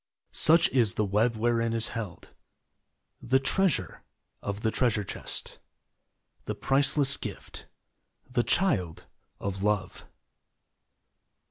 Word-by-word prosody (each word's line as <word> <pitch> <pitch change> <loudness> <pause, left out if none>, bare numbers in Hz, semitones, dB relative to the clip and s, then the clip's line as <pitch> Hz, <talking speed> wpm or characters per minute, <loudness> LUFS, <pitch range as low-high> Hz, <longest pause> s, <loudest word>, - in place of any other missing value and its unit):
Such 165 +1 +6
is 115 -7 +2
the 105 - 0
web 110 +4 0
wherein 115 0 0
is 115 0 +1
held 110 -7 -8 0.9
The 130 +3 +2
treasure 140 - 0 0.4
of 100 +1 -5
the 110 - 0
treasure 110 -4 0
chest - - -5 0.9
The - - -4
priceless 140 0 +3
gift - - -9 0.3
— - - -50
the 125 -1 0
Child 115 - 0 0.3
of 95 -1 -5
Love. 100 -2 -2
115 Hz, 110 wpm, -27 LUFS, 105-135 Hz, 0.9 s, Such